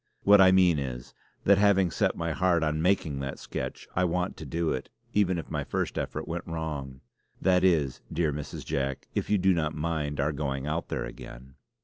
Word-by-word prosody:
What 100 Hz, 0 st, +7 dB
I 95 Hz, -1 st, +7 dB
mean 90 Hz, -4 st, +5 dB
is, 60 Hz, -3 st, -5 dB, 0.3 s
that 100 Hz, 0 st, +5 dB
having 95 Hz, -3 st, +4 dB
set -, -, 0 dB
my 85 Hz, -1 st, -1 dB
heart 85 Hz, 0 st, +2 dB
on 75 Hz, 0 st, 0 dB
making 85 Hz, -6 st, +1 dB
that 70 Hz, 0 st, -4 dB
sketch, -, -, -6 dB
I 90 Hz, -, +2 dB
want 90 Hz, +1 st, 0 dB
to -, -, -8 dB
do 85 Hz, -1 st, -1 dB
it; 65 Hz, -, -4 dB, 0.2 s
even 95 Hz, -3 st, +2 dB
if 85 Hz, -, -6 dB
my -, -, -1 dB
first -, -, -2 dB
effort -, -, -3 dB
went 85 Hz, +3 st, -4 dB
wrong. 75 Hz, -5 st, -5 dB, 0.4 s
That 90 Hz, -1 st, +3 dB
is, 80 Hz, -8 st, +2 dB
dear 80 Hz, -3 st, 0 dB
Mrs. 75 Hz, 0 st, -6 dB
Jack, 70 Hz, -1 st, -2 dB
if -, -, -2 dB
you 105 Hz, -, +4 dB
do 95 Hz, 0 st, +3 dB
not 80 Hz, -2 st, -1 dB
mind 75 Hz, -2 st, -2 dB
our 75 Hz, +2 st, +1 dB
going 70 Hz, -2 st, -3 dB
out 75 Hz, +3 st, -2 dB
there -, -, -3 dB
again." 65 Hz, +2 st, -10 dB
80 Hz, 205 wpm, -28 LUFS, 70-90 Hz, 0.4 s, What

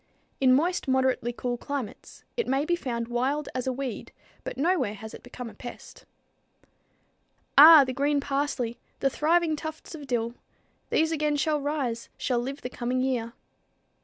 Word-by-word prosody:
In 260 Hz, -1 st, +5 dB
moist, 340 Hz, +7 st, +2 dB
moderately 260 Hz, -2 st, +1 dB
cool 245 Hz, 0 st, -3 dB
climates, 280 Hz, -5 st, -6 dB
it 470 Hz, -, -1 dB
may 270 Hz, +2 st, +1 dB
be 345 Hz, -, +2 dB
found 235 Hz, -8 st, -3 dB
wild 265 Hz, +5 st, -1 dB
as 255 Hz, 0 st, -3 dB
a -, -, +2 dB
weed, 260 Hz, -2 st, -5 dB, 0.3 s
but -, -, -6 dB
nowhere 275 Hz, -, +1 dB
has 220 Hz, +1 st, -9 dB
it -, -, -10 dB
become 245 Hz, 0 st, -8 dB
a 225 Hz, -, -9 dB
pest. 240 Hz, +3 st, -11 dB, 1.5 s
"Ah! 305 Hz, +1 st, +11 dB
the 260 Hz, -1 st, -3 dB
green 285 Hz, +2 st, +1 dB
parsley, 275 Hz, -4 st, -2 dB, 0.2 s
the 275 Hz, -, +1 dB
thriving 325 Hz, +2 st, +2 dB
tufts 315 Hz, +2 st, -7 dB
of 295 Hz, -3 st, -8 dB
dill; 235 Hz, -2 st, -1 dB, 0.6 s
These 320 Hz, +1 st, +2 dB
again 300 Hz, -2 st, +1 dB
shall 300 Hz, 0 st, +1 dB
rise, 275 Hz, -6 st, -2 dB
shall 245 Hz, -2 st, 0 dB
live 270 Hz, +4 st, -5 dB
the -, -, -2 dB
coming 250 Hz, +1 st, -1 dB
year." 245 Hz, -3 st, -1 dB
270 Hz, 160 wpm, -27 LUFS, 245-295 Hz, 1.5 s, Ah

